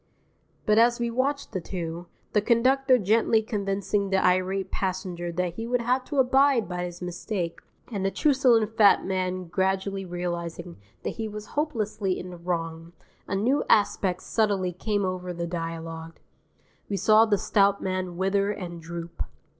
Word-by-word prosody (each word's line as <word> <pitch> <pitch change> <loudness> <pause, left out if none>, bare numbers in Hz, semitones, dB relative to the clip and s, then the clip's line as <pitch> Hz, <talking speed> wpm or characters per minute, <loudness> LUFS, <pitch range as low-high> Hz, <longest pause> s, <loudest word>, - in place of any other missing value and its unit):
_ - - -41 0.6
But 215 +1 +4
as 240 +1 +4
we 235 0 -1
watched 275 +4 -1
the 190 -4 -3
two, 170 -1 -5 0.3
the 210 - +4
conductor 255 +4 +4
gently 220 +1 +3
convincing 200 -1 -1
the 190 - +2
irate 185 +1 +1
passenger 180 -2 -3
that 180 0 -1
he 225 +6 -5
would 245 0 +1
have 255 +2 +1
to 290 - -4
abide 265 -2 +4
by 180 -1 -3
his 175 0 -7
mistake, 180 0 -3 0.3
and 200 -4 -2
the 195 - +2
truculent 240 -4 +3
fat 205 -3 +5
man 185 -1 -1
gradually 190 +2 -1
realizing 175 -1 -5 0.3
that - - -4
he 225 -1 -2
was 210 0 -8
hopelessly 215 -10 -1
in 180 - -7
the 175 - -9
wrong, 165 -1 -4 0.3
a - - -2
new 245 +9 +2
aspect 195 -3 +2
subtly 200 -5 0
came 205 +2 -1
over 180 -1 -3
the 170 0 -3
dialogue. 165 -1 -5 0.7
We 200 - -1
saw 215 +3 +6
the 205 -2 +3
stout 200 0 +3
man 185 -2 -2
wither 195 +2 +1
and 175 -5 -5
droop. 170 +1 -7
195 Hz, 160 wpm, -26 LUFS, 180-220 Hz, 0.7 s, saw